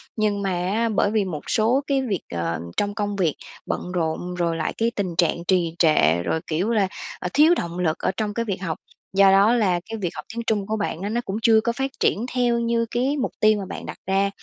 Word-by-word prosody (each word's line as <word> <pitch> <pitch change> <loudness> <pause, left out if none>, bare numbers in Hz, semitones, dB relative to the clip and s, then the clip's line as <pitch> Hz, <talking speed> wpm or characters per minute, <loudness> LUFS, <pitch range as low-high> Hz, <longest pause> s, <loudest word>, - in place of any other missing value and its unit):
Nhưng 210 -2 0
mà 195 -1 -1
á 190 +6 0
bởi 205 -1 +1
vì 215 -2 +1
một 160 -6 -5
số 235 +4 +3
cái 275 -1 +2
việc, 210 -9 -2
ờ, 85 -1 -2 0.2
trong 205 0 0
công 205 -2 -2
việc, 175 -6 +1 0.3
bận 180 - -3
rộn 175 +1 -2
rồi 170 -2 0
lại 165 - -2
cái 230 +1 +1
tình 185 -4 -2
trạng 170 -1 +2
trì 175 -3 +2
trệ, 85 - +4
rồi, 125 - 0
kiểu, 170 +7 0
là, 210 -4 +2 0.3
à, 180 - -3
thiếu 310 +4 +6
động 170 +1 -4
lực 165 -3 +1
ở - - 0
trong 215 -2 -1
cái 230 +2 -2
việc 195 -4 -3
học, 165 -4 -3 0.4
do 195 0 +6
đó 200 +4 +5
là 195 -7 +2
cái 225 - -4
việc 180 - 0
học 150 - -7
tiếng 235 - -3
Trung 205 -3 0
của 215 - -1
bạn 200 -5 -3
á 200 - -2
nó 235 +3 0
cũng 195 -4 -5
chưa 220 -1 +5
có 235 - 0
phát 270 +3 -2
triển 220 - +1
theo 240 -2 +2
như 230 0 +1
cái 260 +5 0
mục 260 - -1
tiêu 215 -1 +4
mà 195 - -4
bạn - - -7
đặt - - -7
ra. 195 +1 +2
200 Hz, 250 wpm, -23 LUFS, 175-230 Hz, 0.4 s, thiếu